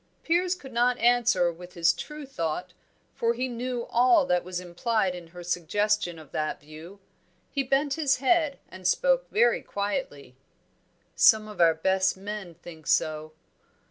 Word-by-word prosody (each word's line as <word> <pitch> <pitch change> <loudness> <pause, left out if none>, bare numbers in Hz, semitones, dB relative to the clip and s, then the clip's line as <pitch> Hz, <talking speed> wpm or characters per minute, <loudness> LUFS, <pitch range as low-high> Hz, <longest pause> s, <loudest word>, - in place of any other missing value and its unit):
Piers 355 +2 +1
could 270 -8 -12
not 245 +1 +2
answer 235 -8 +3
with 180 +2 -12
his 170 0 +3
true 300 - -8
thought, 180 - -4 0.4
for 230 0 0
he 255 +2 -1
knew 245 0 -4
all 255 +6 +4
that 180 -7 +1
was 180 0 -4
implied 185 +3 -1
in 175 -2 -9
her 175 +1 -11
suggestion 175 +2 0
of 155 -3 -14
that 155 0 -2
view. 155 +6 -12 0.5
He 280 - 0
bent 275 +2 +1
his 290 -3 +1
head 290 +1 +2
and 185 -1 -5
spoke - - +2
very 470 +4 +3
quietly. 200 - -4 0.8
"Some 215 -1 +5
of 210 -4 -5
our 165 -1 +5
best 190 +3 +1
men 195 -3 -7
think 160 -2 -13
so." 155 0 0
205 Hz, 155 wpm, -27 LUFS, 175-255 Hz, 0.8 s, Some